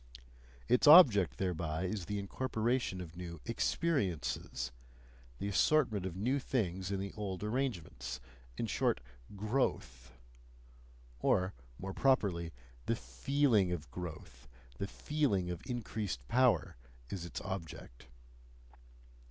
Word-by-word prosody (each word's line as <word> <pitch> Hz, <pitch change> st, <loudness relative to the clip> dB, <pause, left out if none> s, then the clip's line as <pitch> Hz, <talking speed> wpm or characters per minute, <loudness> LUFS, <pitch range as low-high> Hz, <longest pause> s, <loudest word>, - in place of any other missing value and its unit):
Its 125 Hz, +4 st, +4 dB
object 105 Hz, -, +8 dB
thereby 85 Hz, -3 st, -1 dB
is 95 Hz, 0 st, -2 dB
the 105 Hz, +2 st, -3 dB
incorporation 115 Hz, 0 st, -1 dB
of 85 Hz, -2 st, -9 dB
new 85 Hz, -2 st, -7 dB
"experiences," 90 Hz, -, -1 dB, 0.7 s
the 100 Hz, -, -3 dB
assortment 105 Hz, -2 st, +2 dB
of 90 Hz, -, -6 dB
new 125 Hz, +8 st, +1 dB
things 95 Hz, -8 st, -1 dB
in 100 Hz, -1 st, -1 dB
the 100 Hz, 0 st, -4 dB
old 100 Hz, -3 st, -4 dB
arrangements 105 Hz, -, -3 dB, 0.4 s
in -, -, -1 dB
short, -, -, +1 dB, 0.4 s
growth; 100 Hz, -, -1 dB, 1.1 s
or 95 Hz, +8 st, +2 dB, 0.2 s
more 95 Hz, 0 st, -5 dB
properly, 95 Hz, -12 st, +2 dB, 0.4 s
the -, -, +2 dB
FEELING 105 Hz, -, +2 dB
of 75 Hz, -6 st, -4 dB
growth, 80 Hz, -6 st, -8 dB, 0.3 s
the 100 Hz, -, -2 dB
feeling 100 Hz, -9 st, 0 dB
of 90 Hz, -, -5 dB
increased 105 Hz, -, -3 dB
power 120 Hz, -, +3 dB, 0.3 s
is 95 Hz, -4 st, -4 dB
its 85 Hz, -, -5 dB
object. 80 Hz, -9 st, -7 dB
95 Hz, 110 wpm, -34 LUFS, 85-120 Hz, 1.1 s, object